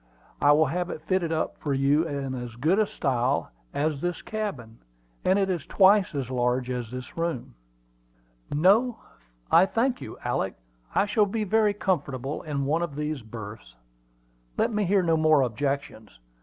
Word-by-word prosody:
I 145 - +6
will 155 +2 +4
have 175 +5 -2
it 155 - -6
fitted 180 -2 0
up 160 -1 -1
for 145 -3 -1
you 145 +4 +2
in 140 -3 -3
as 120 -2 -6
good 180 - +2
style 135 - 0 0.2
as 145 -1 -1
this 175 -1 -3
cabin; 145 - -5 0.4
and 190 +1 +3
it 195 -1 +2
is 175 -5 -2
twice 195 -3 +4
as 130 -3 -3
large 125 0 0
as 125 -3 -3
this 125 +1 -8
room." 165 -6 -3 1.0
"No, 205 - +4 0.5
I 190 - +6
thank 245 +4 0
you, - - -8
Alick. 110 -6 -1 0.4
I - - +4
shall 210 0 +2
be 215 +2 -2
very 210 0 +2
comfortable 140 -8 -2
in 145 -3 -3
one 155 +4 +1
of 170 -5 -3
these 150 -1 -3
berths. 110 - -9 0.8
Let - - +1
me 210 -1 +1
hear 190 +1 +3
no 165 -2 +2
more 155 -2 +4
objections. 130 -2 -3
155 Hz, 165 wpm, -26 LUFS, 130-190 Hz, 1.0 s, I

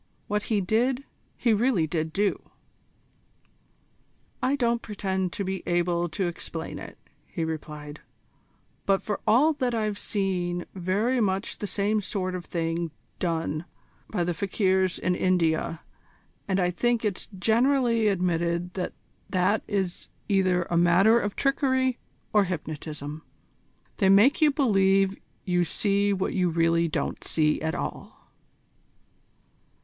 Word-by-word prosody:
What 210 0 -1
he 210 -3 +2
did, 245 +7 +1 0.3
he 235 - +2
really 215 -6 +2
did 160 0 -2
do." 200 +3 -1 1.9
"I 260 +2 +2
don't 235 -3 +1
pretend 190 -3 -2
to 200 - -3
be 190 0 -3
able 175 0 +1
to 170 +5 -2
explain 165 -1 -5
it," - - -10 0.3
he 165 - -4
replied, 150 -2 -6 0.9
"but 195 -1 +2
for 210 - -2
all 265 +9 +5
that 255 -5 -1
I've 215 -2 -1
seen 180 -3 -1
very 205 +7 0
much 195 -1 -1
the 205 - -3
same 210 +2 0
sort 185 -2 -2
of 180 -1 -5
thing 165 0 -2 0.3
done 165 -2 -1 0.4
by 175 - 0
the 175 0 0
fakirs 190 0 +1
in 180 - 0
India, 165 -3 +1 0.7
and 195 -1 +1
I 180 -1 +2
think 235 +4 0
it's 200 -3 -2
generally 230 +1 +3
admitted 175 -2 0
that 185 -2 -3 0.4
that 185 +3 +2
is 190 -3 -2 0.2
either 185 -3 +2
a 170 0 -1
matter 185 +7 +5
of 205 -3 -3
trickery 260 -2 +1 0.3
or 210 -2 +5
hypnotism. 155 -3 -5 0.8
They 195 -4 +3
make 215 +11 +5
you 305 - +7
believe 195 -8 +3 0.3
you 180 -2 +2
see 200 +4 +1
what 190 -1 -1
you 180 -2 +2
really 165 0 +2
don't 155 - -3
see 150 -1 +1
at 160 0 -1
all." - - -7
190 Hz, 135 wpm, -26 LUFS, 175-215 Hz, 1.9 s, you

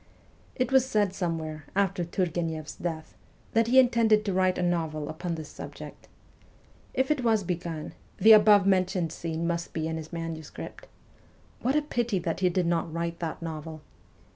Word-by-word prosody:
It 255 -2 -1
was 265 -1 +6
said 210 -7 +1
somewhere, 160 -4 -3
after 195 -2 +1
Turgueneff 165 -3 -2
's - - -7
death, 160 -2 -5 0.4
that 230 0 +3
he 255 +3 +3
intended 230 -4 +5
to 200 - 0
write 185 0 +2
a 180 - -1
novel 160 -4 -1
upon 170 +2 -4
this 155 -2 -7
subject. - - -10 0.9
If 265 +2 +1
it 285 -4 0
was 220 -3 +3
begun, 170 -3 -4 0.2
the 220 - +7
above 210 -2 +7
mentioned 185 -3 +2
scene 165 0 -3
must 170 0 -2
be 160 -1 -2
in 160 0 -3
his 160 0 -8
manuscript. 165 -2 -7 0.7
What 260 +4 +1
a 300 - +3
pity 240 -7 -1
that 170 -2 -2
he 185 -1 +3
did 180 0 0
not 170 -1 0
write 170 +1 -3
that 165 0 -4
novel 155 -1 -6
175 Hz, 170 wpm, -28 LUFS, 160-210 Hz, 0.9 s, the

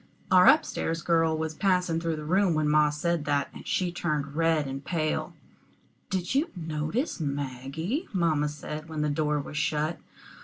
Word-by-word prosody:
Our 185 -1 +7
up 310 - +7
stairs 165 +1 -3
girl 165 -2 +2
was 160 0 -2
passing 180 -2 +1
through 165 -1 -1
the 155 - -6
room 185 +1 +3
when 155 -1 +1
ma 150 0 +4
said 150 +1 -1
that, 140 -1 0
and - - -11
she 180 -2 0
turned 150 -4 -2
red 165 -2 +2
and 135 0 -5
pale. 155 -2 -2 0.7
"Did 185 +1 -1
you 295 +5 +2
notice 160 - -2
Maggie?" 145 - -3
mamma 160 -6 +1
said, 150 +1 -7
when 155 -1 -3
the 150 - +1
door 150 0 0
was 150 +1 -6
shut. 150 +2 0
155 Hz, 175 wpm, -27 LUFS, 150-175 Hz, 0.7 s, Our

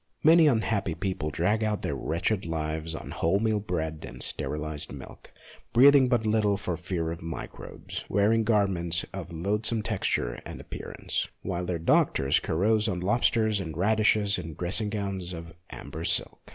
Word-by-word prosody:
Many 160 0 +7
unhappy 110 - +1
people 90 -3 -2
drag 95 +8 +1
out 105 -1 -1
their - - -1
wretched 85 +4 -1
lives 80 0 -3
on - - -7
wholemeal 105 +4 +1
bread 80 -3 -3
and - - -9
sterilized 75 0 -3
milk, - - -11 0.4
breathing 135 +1 +7
but 120 -3 +2
little 105 -2 +2
for 90 -4 -3
fear 85 -1 -3
of 85 - -6
microbes, 80 0 -7
and - - -13
wearing 105 +3 +3
garments 95 -6 +1
of - - -6
loathsome 105 +6 +1
texture 75 - -1
and - - -8
appearance, - - -4 0.2
while 90 +1 -2
their 90 - -1
doctors 70 -3 +3
carouse 105 +6 +1
on 90 -4 -1
lobsters 110 +1 +2
and 80 -5 -5
radishes 105 +1 +2
in 80 -1 -7
dressing 105 +4 -1
gowns 100 -4 -3
of 85 -1 -8 0.2
amber 80 - -7
silk. 85 -2 -1
95 Hz, 155 wpm, -27 LUFS, 80-110 Hz, 0.4 s, Many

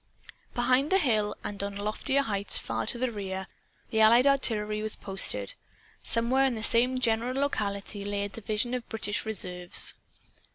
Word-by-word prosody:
Behind 255 +5 +2
the 385 - +5
hill, 215 - +1
and 200 -1 -4
on 200 0 -4
loftier 215 +7 -1
heights 200 -5 +1
far - - -3
to 240 - -1
the 250 0 -1
rear, 190 -3 -5 0.5
the 220 - 0
Allied 235 +4 +6
artillery 215 -6 +1
was 215 0 -2
posted. 190 - +2 0.5
Somewhere 235 +4 +1
in 260 -3 +1
the 220 - -5
same 250 +3 +4
general 245 +1 0
locality 205 -6 -2
lay 200 0 -2
a 200 - -4
division 220 +3 -2
of 250 -2 -4
British 210 0 -2
reserves. 180 -4 -1
220 Hz, 160 wpm, -28 LUFS, 200-250 Hz, 0.5 s, Allied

